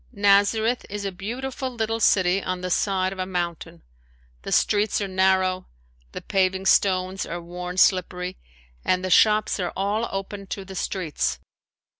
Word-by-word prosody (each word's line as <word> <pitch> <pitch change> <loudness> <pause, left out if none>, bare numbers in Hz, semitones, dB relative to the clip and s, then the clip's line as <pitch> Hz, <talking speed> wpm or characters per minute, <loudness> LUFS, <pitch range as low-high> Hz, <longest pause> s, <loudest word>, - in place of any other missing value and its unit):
Nazareth 205 +3 +3
is 205 0 -5
a 195 - -2
beautiful 255 +8 -5
little 225 -2 -2
city 190 -3 +3
on 185 0 -3
the 180 0 -3
side 190 0 +1
of 190 - -11
a 185 - -1
mountain. 170 - -4 0.6
The - - -7
streets 210 +1 +2
are 200 - -2
narrow, 185 -1 +1 0.4
the - - -7
paving 190 0 0
stones 185 -1 +2
are 175 - -5
worn 180 +1 -7
slippery, 185 -1 +2 0.5
and 185 0 +1
the 185 - -2
shops 215 +1 +4
are 180 -2 -2
all 205 +4 -1
open 195 0 -5
to 195 0 -6
the 190 - -9
streets. 180 -4 -2
190 Hz, 155 wpm, -24 LUFS, 185-205 Hz, 0.6 s, shops